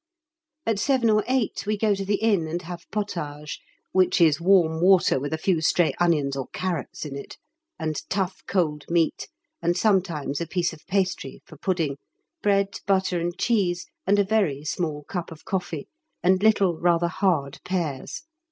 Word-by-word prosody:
At 225 -3 +1
7 250 -2 +3
or 215 0 +3
8 255 -5 0
we 210 0 +1
go 210 0 +2
to 195 0 -3
the 205 +1 +1
Inn 200 -6 +1
and 170 +3 -3
have 175 0 -8
pôtage 150 -8 -4 0.3
(which 185 -1 +3
is 160 -2 +4
warm 170 -3 +4
water 180 -6 +5
with 145 +2 -4
a 160 - 0
few 165 0 +1
stray 165 +1 +3
onions 150 -6 +2
or 135 -2 -4
carrots 175 -5 -4
in 140 -2 -6
it), 140 - -8 0.4
and 155 -2 -2
tough 190 -1 -1
cold 155 -6 0
meat, 170 -1 +1 0.3
and 175 +1 +1
sometimes 175 -8 +1
a 170 - -2
piece 175 0 0
of 160 - -15
pastry 185 -8 -1
(for 155 - -13
pudding), 155 -3 -1 0.4
bread, 200 -1 +1
butter, 190 -2 +2
and 170 +1 -3
cheese, 190 -7 +1 0.2
and 200 +1 +4
a 205 - +5
very 190 -9 0
small 155 -3 -2
cup 175 +2 -5
of 160 - -12
coffee, 180 -6 -3 0.4
and 185 +1 +4
little, 200 -6 +3
rather 170 0 +3
hard 160 -6 0
pears. 165 -8 -3
175 Hz, 170 wpm, -25 LUFS, 160-195 Hz, 0.4 s, water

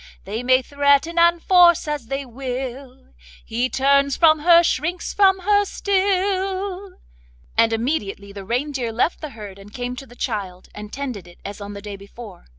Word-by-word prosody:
They 210 +5 -4
may 255 +1 +3
threaten 285 +5 +2
and 340 0 +4
force 350 -4 +5
as 295 -6 -4
they 275 +2 -3
will, 255 - -7 0.3
He 240 +3 -1
turns 280 +1 +2
from 315 -2 +5
her, 340 +2 +6
shrinks 335 +3 -2
from 385 -2 +4
her 410 +2 +3
still,' 385 -1 -1 0.6
and 230 0 +4
immediately 225 -5 -2
the 200 -1 -8
reindeer 245 +2 -2
left 240 +9 -1
the 310 - -5
herd 200 -2 -9
and 200 +1 -14
came 245 +1 -5
to 270 - -9
the 245 - -16
child, 200 -8 -5
and 210 0 -9
tended 250 -10 -6
it 175 - -16
as 205 +1 -7
on 200 0 -7
the 200 0 -9
day 205 -1 -7
before. 200 -1 -12
270 Hz, 170 wpm, -21 LUFS, 225-340 Hz, 0.6 s, her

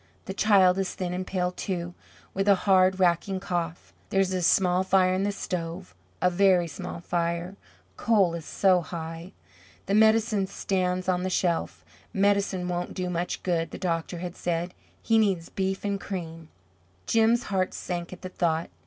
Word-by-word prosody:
The 190 - -5
child 195 -2 +4
is 190 -2 -2
thin 180 -1 -3
and 185 +1 -4
pale, 180 -1 -1
too, 175 -2 -4 0.4
with 195 +1 -1
a 200 - +7
hard, 190 -1 +4
racking 185 +2 +2
cough. 175 -3 -4 0.2
There 195 - +1
is 190 -1 +2
a 185 - -1
small 180 +1 +3
fire 185 -1 +3
in 185 - 0
the 205 +1 0
stove, 180 -2 -5 0.3
a 180 - +4
very 180 -1 +4
small 165 +2 -7
fire; 170 +2 -2 0.4
coal 200 -7 +3
is 170 -1 -5
so 185 +2 +3
high. 165 +1 -7 0.5
The 195 - -1
medicine 220 -2 +3
stands 185 -1 -1
on 180 -1 +1
the 185 - -1
shelf. 175 -2 -1 0.3
"Medicine 200 -2 +1
won't 175 0 -3
do 180 -1 -2
much 175 +1 -3
good," 170 -2 0
the - - -8
doctor 170 -1 -2
had 175 +1 -6
said; 175 +1 -2 0.3
"he 225 -1 +3
needs 190 -6 +1
beef 190 +1 -2
and 200 -1 -1
cream." 165 -4 -6 0.6
Jim's 230 +1 +3
heart 185 -1 +1
sank 175 -1 -4
at 185 - -11
the 185 - -5
thought. 165 -2 -1
185 Hz, 170 wpm, -26 LUFS, 175-195 Hz, 0.6 s, a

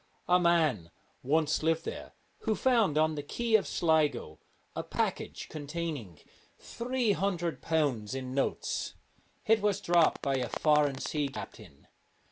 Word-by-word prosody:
A 180 0 +5
man 155 - +2 0.3
once 155 +2 +1
lived 165 +1 +1
there - - -6 0.3
who 220 - 0
found 225 - +2
on 155 0 +3
the 150 - -3
quay 230 +10 -3
of 220 -3 +5
Sligo 155 - +1 0.4
a - - -1
package - - -3
containing 145 - -5 0.4
three 245 -2 -1
hundred 180 -4 -1
pounds 135 -9 0
in 130 -1 -5
notes. 135 - -2 0.5
It 225 -1 +4
was 205 -2 +1
dropped 170 -2 +3
by 135 -1 +1
a 125 -2 -2
foreign 150 -3 +2
sea 145 +1 -1
captain. 105 - -10
155 Hz, 135 wpm, -30 LUFS, 135-180 Hz, 0.5 s, A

